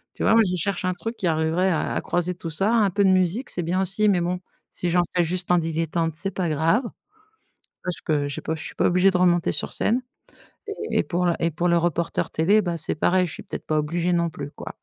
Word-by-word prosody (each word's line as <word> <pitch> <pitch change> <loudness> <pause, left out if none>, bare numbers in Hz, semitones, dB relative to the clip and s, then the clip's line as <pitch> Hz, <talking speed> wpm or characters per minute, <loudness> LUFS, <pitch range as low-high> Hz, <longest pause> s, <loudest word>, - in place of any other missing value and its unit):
Tu - - -4
vois, - - +4
moi, 225 - +6
qui 180 -2 -1
cherche 185 +1 -2
un 185 - +1
truc 225 +5 -6
qui 180 - -1
arriverait 160 +4 +1
à 160 - -1
à - - 0
croiser 175 0 -1
tout 170 -2 -6
ça. 195 +8 +1
Un 215 -4 +4
peu 200 +2 +1
de 190 - +5
musique, 185 +7 +1
c'est 175 - -3
bien 180 +3 0
aussi, 195 +3 +2
mais 180 -3 +2
bon, 180 +1 -1 0.3
si 175 - -2
j'en 175 +1 +3
fais 175 - +4
juste 180 +1 -2
en 180 - +5
dilettante, 165 0 -1
c'est 195 +5 -3
pas 180 -3 -2
grave. 165 - +2 0.9
Ça, 180 - -5
je - - -15
peux 145 -2 0
je 140 - -5
peux 160 - -2
je 150 - -8
suis - - -8
pas - - +1
obligée 180 +2 +4
de 180 - +1
remonter 175 -1 +3
sur 150 - -2
scène. 245 +4 +1 0.9
Et - - +2
pour 180 +1 -1
le 170 - +2
et 165 - +1
pour 170 +3 -1
le 170 - +4
reporter 170 0 -1
télé, 200 +7 +3
ben, 175 -2 -2
c'est 160 - -2
pareil, 180 +3 +2
je 160 - -7
suis - - -8
peut-être - - -7
pas 155 - +1
obligée 170 +4 0
non 170 -1 +1
plus, 145 -2 -7
quoi. - - -9
175 Hz, 260 wpm, -24 LUFS, 165-185 Hz, 0.9 s, moi